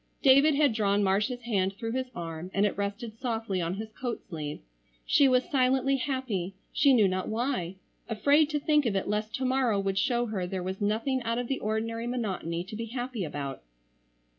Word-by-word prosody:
David 275 +2 +6
had 285 -4 +3
drawn 205 -2 +2
Marcia's 210 +6 +1
hand 195 -5 0
through 225 +2 -4
his 255 +1 -2
arm 165 0 -5
and 200 +1 +4
it 205 - 0
rested 205 +3 -4
softly 225 -6 -2
on 170 +2 -2
his 215 +2 -6
coat 245 +1 -4
sleeve. 155 -5 -5 0.5
She 280 - +5
was 255 -1 +3
silently 265 0 +2
happy, 245 -9 -2 0.2
she 280 - +5
knew 225 -6 +5
not 185 0 -2
why, 220 -6 -1 0.3
afraid 285 +7 +3
to 300 -1 0
think 295 -2 +2
of 205 - 0
it 195 - -1
lest 210 +1 -1
to 260 -1 -2
morrow 255 -5 +2
would 195 -1 0
show 240 +4 +1
her 200 -6 -3
there 185 0 -3
was 190 +2 -4
nothing 225 +6 0
out 230 0 -1
of 245 0 -2
the 270 - -1
ordinary 225 +2 -2
monotony 190 -8 -2
to 205 +4 -9
be 230 +1 -4
happy 245 -2 -4
about. 145 -3 -5
225 Hz, 195 wpm, -28 LUFS, 195-255 Hz, 0.5 s, David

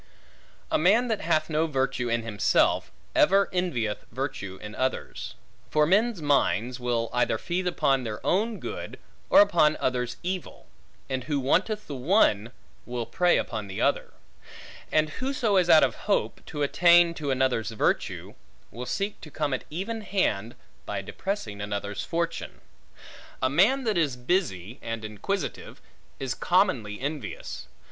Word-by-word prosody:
A - - +3
man 220 +9 +4
that 220 -2 -1
hath 155 -1 +1
no 160 +1 +1
virtue 130 -4 -1
in 115 0 0
himself, 105 -3 +2 0.2
ever 195 +1 +4
envieth 125 - -1
virtue 115 -7 -4
in 105 - -8
others. 130 +3 -3 0.3
For 150 0 +3
men's 200 +1 +2
minds, 130 -4 +1
will 120 -2 -1
either 125 0 +2
feed 180 +1 -2
upon 140 -6 +2
their 110 -3 -4
own 215 +4 +1
good, - - -6 0.3
or - - +8
upon 170 -7 +4
others' 125 -2 -1
evil; 185 0 -5 0.4
and 130 -1 -3
who 145 -1 0
wanteth 205 - +1
the 145 - -7
one, 125 - +2 0.4
will 120 -1 -3
prey 175 +10 +3
upon 110 -3 -3
the 95 - -6
other; - - 0 0.8
and 155 0 +2
whoso 255 -6 0
is 180 -2 +3
out 155 - +8
of - - +2 0.2
hope, 200 - 0
to 150 -2 -3
attain 170 +3 +5
to 150 -4 -4
another's 130 -4 +1
virtue, 110 - -1 0.4
will 125 +3 -7
seek 200 +1 -3
to 155 - -10
come 145 -1 -2
at 130 - -3
even 200 +8 -4
hand, 120 - -1 0.3
by - - -3
depressing 150 - -4
another's 100 0 -3
fortune. 170 0 -3 0.8
A 130 - +1
man 220 - +4
that 215 -6 +1
is 145 -6 +1
busy, 125 - -1
and 115 -1 -4
inquisitive, 125 - -4 0.4
is 135 -3 -2
commonly 135 - +1
envious. 140 -3 -5
145 Hz, 150 wpm, -27 LUFS, 120-185 Hz, 0.8 s, or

